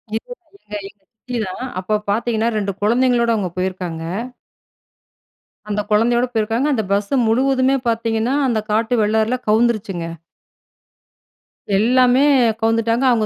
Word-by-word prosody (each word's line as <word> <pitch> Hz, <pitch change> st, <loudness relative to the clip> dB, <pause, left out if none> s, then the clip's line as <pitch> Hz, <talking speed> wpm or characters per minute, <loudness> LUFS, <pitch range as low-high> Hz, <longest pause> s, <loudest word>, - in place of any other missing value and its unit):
எங்க 225 Hz, -, -5 dB, 0.3 s
எங்க 210 Hz, -, -10 dB
எங்க 200 Hz, 0 st, -18 dB
சித்தி 245 Hz, +2 st, -6 dB
தான். 185 Hz, +7 st, -6 dB, 0.2 s
அப்போ 215 Hz, +3 st, -1 dB, 0.2 s
பார்த்தீங்கன்னா 225 Hz, +1 st, 0 dB
2 200 Hz, -1 st, -1 dB
கொழந்தைங்களோட 240 Hz, +2 st, +2 dB
அவங்க 195 Hz, -4 st, -2 dB
போயிருக்காங்க. 180 Hz, -3 st, -3 dB, 1.7 s
அந்த 210 Hz, 0 st, 0 dB
கொழந்தையோட 235 Hz, +3 st, +3 dB
போயிருக்காங்க. 225 Hz, +4 st, 0 dB
அந்த 220 Hz, -4 st, 0 dB
பஸ்ஸு 200 Hz, +6 st, 0 dB
முழுவதுமே 260 Hz, +3 st, +2 dB
பார்த்தீங்கன்னா, 230 Hz, +1 st, 0 dB
அந்த 230 Hz, -3 st, +1 dB
காட்டு 225 Hz, +3 st, +1 dB
வெள்ளாறுல 220 Hz, +3 st, +1 dB
கவுந்துருச்சுங்க. 215 Hz, -6 st, +1 dB, 1.7 s
எல்லாமே, 250 Hz, +4 st, +4 dB, 0.4 s
கவுந்துட்டாங்க. 230 Hz, +2 st, +1 dB
அவங்க 230 Hz, -3 st, +2 dB
225 Hz, 115 wpm, -19 LUFS, 210-240 Hz, 1.7 s, எல்லாமே